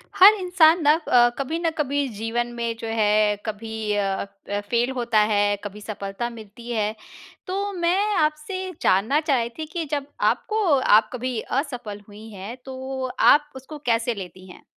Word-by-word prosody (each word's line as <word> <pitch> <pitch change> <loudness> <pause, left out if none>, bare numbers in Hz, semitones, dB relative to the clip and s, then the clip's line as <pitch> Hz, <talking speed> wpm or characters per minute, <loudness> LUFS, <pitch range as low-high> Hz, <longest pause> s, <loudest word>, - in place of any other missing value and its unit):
हर 390 +3 +9
इंसान 355 -2 +4
ना 295 +1 +6
अ, 250 -7 +4
कभी 290 +5 -2
न 340 -1 +1
कभी, 285 -1 0
जीवन 225 +3 -2
में 235 -1 -3
जो 225 - -5
है, 210 -1 +2
कभी 220 0 -4
अ 195 -1 -1 0.2
अ, 205 0 -1
फ़ेल 240 +1 +1
होता 235 -3 +2
है, 205 0 +2
कभी 205 0 -7
सफलता 205 +2 -5
मिलती 230 0 -11
है। 215 -2 -1 0.5
तो 400 +2 -2
मैं 375 +4 +1
आपसे 310 +5 -1
जानना 220 +11 +3
चाह 295 -4 +1
रही 235 -1 -1
थी 315 - -3
कि 325 +1 -4
जब 285 -2 -1 0.3
आपको 435 0 -2 0.2
आप 215 -3 +4
कभी 250 -1 -3
असफल 245 -7 -4
हुई 210 +1 -12
हैं, 200 +4 -7
तो 265 0 -5
आप 295 0 +5
उसको 270 +4 -9
कैसे 235 0 +1
लेती 185 -1 -9
हैं? - - -15
240 Hz, 170 wpm, -23 LUFS, 215-305 Hz, 0.5 s, हर